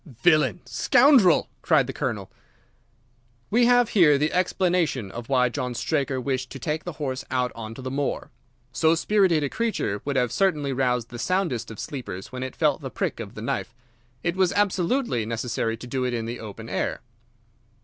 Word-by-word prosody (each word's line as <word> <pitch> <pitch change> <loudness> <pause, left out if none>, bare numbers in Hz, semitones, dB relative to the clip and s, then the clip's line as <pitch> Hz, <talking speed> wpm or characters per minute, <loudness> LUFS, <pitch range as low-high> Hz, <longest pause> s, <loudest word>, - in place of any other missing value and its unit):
"Villain! 155 -4 +4
Scoundrel!" 240 - +5
cried - - +3
the - - -5
Colonel. - - -3 1.2
"We 235 +2 +4
have 245 -1 +4
here 160 -8 +5
the 150 +2 0
explanation 180 - +1
of 120 +3 -8
why 125 -2 +3
John 125 -1 -3
Straker 135 0 -1
wished 130 0 -2
to - - -8
take 150 +5 -3
the 175 - -4
horse 135 -3 -4
out 125 -1 0
on 115 -1 -7
to 130 - -9
the 130 - -4
moor. 140 +1 -2 0.4
So 160 +5 +3
spirited 175 -3 +2
a - - +1
creature 215 - -2
would 140 -1 -2
have 125 -3 +1
certainly 150 -7 +1
roused 125 -3 0
the 120 - -8
soundest 170 - -1
of 110 - -9
sleepers 120 -9 -6
when 130 0 -6
it 130 -1 -5
felt - - +1
the - - -5
prick - - -3
of - - -7
the - - -7
knife. 115 - -3 0.5
It 175 0 0
was 185 -2 +3
absolutely 200 - +1
necessary 115 0 -2
to 120 - -9
do 130 +1 -2
it 125 -1 -1
in 115 -1 -3
the 120 +1 -5
open 110 +1 -8
air." - - -2
135 Hz, 185 wpm, -25 LUFS, 125-175 Hz, 1.2 s, Scoundrel